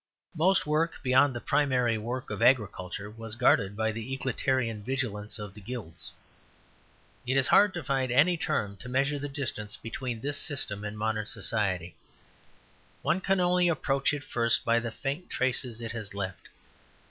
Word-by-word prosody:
Most 180 +4 +3
work 155 +2 +1
beyond 130 +1 +4
the - - -2
primary 125 -4 +2
work 120 +4 -4
of - - -4
agriculture 105 -5 +2
was 110 +1 -7
guarded 100 -3 +3
by 110 0 +1
the 115 +3 -6
egalitarian 130 -4 0
vigilance 110 -4 -2
of 105 -3 -7
the 105 - -12
Guilds. 105 -6 -6 1.2
It 130 +2 +2
is 130 - +2
hard 205 0 +6
to 175 - -4
find 130 -1 0
any 155 +8 +5
term 105 -11 -1
to 125 - -8
measure 140 +3 +1
the 145 +1 -4
distance 115 -6 -3
between 115 +1 -4
this 145 +2 -1
system 105 -9 -1
and 105 0 -5
modern 110 -1 -1
society; 100 -6 -2 1.1
one 190 - +1
can 195 0 +2
only 180 0 +4
approach 140 -4 +1
it 145 -1 -3
first 115 -3 +1
by 115 0 +4
the 115 0 -3
faint 140 +9 -4
traces 125 -2 0
it 115 -1 -4
has 105 -4 -6
left. 95 -2 -5
120 Hz, 165 wpm, -29 LUFS, 110-140 Hz, 1.2 s, hard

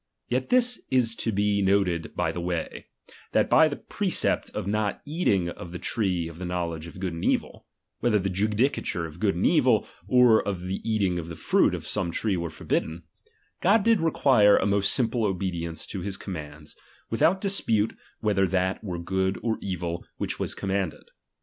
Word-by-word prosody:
Yet 130 +1 -1
this 250 0 +3
is 125 -3 +3
to 115 - -1
be 100 0 +1
noted 95 -4 +1
by 90 -2 0
the 85 - -5
way; 85 -2 -4 0.5
that - - +2
by - - +7
that - - -7
precept - - +1
of - - -5
not 105 +1 -1
eating 110 - +1
of 85 0 -8
the - - -4
tree 90 -3 0
of 85 0 -10
the 90 - -4
knowledge 85 -2 -3
of 85 - -11
good 95 -2 -3
and 85 - -6
evil, - - -1 0.3
(whether 115 -3 +2
the 95 -1 -1
judicature 105 -2 0
of 80 +1 -10
good 100 -2 +1
and 90 - 0
evil, 125 -10 +3 0.2
or 125 -3 +5
the 95 -1 -4
eating 100 -6 0
of 80 - -6
the 85 - -7
fruit - - +2
of - - -7
some - - -1
tree 100 +4 0
were 85 -1 -3
for 80 - -12
bidden), 80 +2 -1 0.6
God 200 +3 +4
did 225 -4 +3
require 130 -10 +4
a - - +1
most 100 -1 +3
simple 120 -1 +1
obedience 90 -4 -2
to 95 - -6
his 100 +1 -4
commands, 75 -5 -8 0.4
without 165 - +3
dispute 115 - +1 0.3
whetber 95 -3 +2
that 95 +2 0
were 90 -4 -4
good 95 +2 -1
or 115 -2 -1
evil 85 -3 -4
which - - -3
was - - -3
commanded. 95 -4 -3
95 Hz, 185 wpm, -26 LUFS, 85-110 Hz, 0.6 s, by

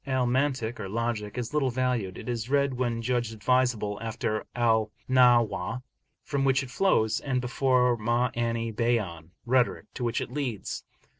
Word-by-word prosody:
Al 130 -2 +1
Mantik 130 -2 0
(or 100 -3 -5
logic) 110 -1 -2
is 125 +2 -4
little 145 -3 +2
valued; 125 -6 -1
it - - -9
is 120 -1 -3
read 140 -1 +2
when 120 -2 -1
judged 120 -1 0
advisable, 110 -2 +1
after 110 -1 -3
Al 110 -3 +2 0.2
Nahw, 125 -3 +3 0.4
from 140 -2 -1
which 135 0 +3
it 125 - -9
flows, 110 - +2
and 130 -3 -1
before 125 -1 +2
Ma'ani 115 0 0
Bayan 105 -9 -1 0.2
(rhetoric) 125 0 +2
to 125 - -5
which 115 0 0
it - - -5
leads. 125 -9 -3
120 Hz, 155 wpm, -27 LUFS, 110-130 Hz, 0.4 s, Nahw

